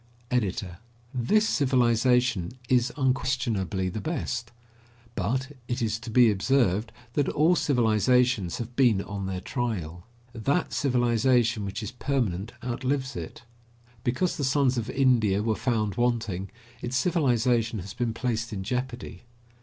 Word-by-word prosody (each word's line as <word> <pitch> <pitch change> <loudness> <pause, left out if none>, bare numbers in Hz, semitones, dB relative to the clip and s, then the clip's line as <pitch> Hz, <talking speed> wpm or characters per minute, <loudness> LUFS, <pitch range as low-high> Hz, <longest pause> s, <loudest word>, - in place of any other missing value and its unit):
EDITOR: 95 -6 -1 0.3
This 170 - +2
civilization 125 - +2
is 125 -1 +2
unquestionably 125 -8 0
the 100 +4 -4
best; 125 -7 -3 0.6
but 130 +8 -1 0.2
it 120 - -2
is 110 -1 -1
to 115 - -8
be 120 0 +5
observed 110 -1 +1 0.2
that 145 - +1
all 160 +4 +3
civilizations 120 - +2
have 120 0 -6
been 120 -7 +3
on 100 -1 -5
their 95 -1 -3
trial. 90 - -4 0.3
That 135 +9 0
civilization 120 -3 +2
which 100 +3 -4
is 105 - -5
permanent 120 -6 -2
outlives 130 +2 -2
it. - - -7 0.6
Because 130 +9 0
the 145 - -2
sons 130 -1 +2
of 120 -1 -3
India 120 -7 +2
were 110 0 +1
found 110 -4 -1
wanting, 115 -6 0 0.3
its 125 +1 -2
civilization 125 -8 +2
has 95 0 -7
been 120 0 -1
placed 115 -2 -2
in 95 -3 -4
jeopardy. 125 +3 -4
120 Hz, 130 wpm, -27 LUFS, 105-130 Hz, 0.6 s, be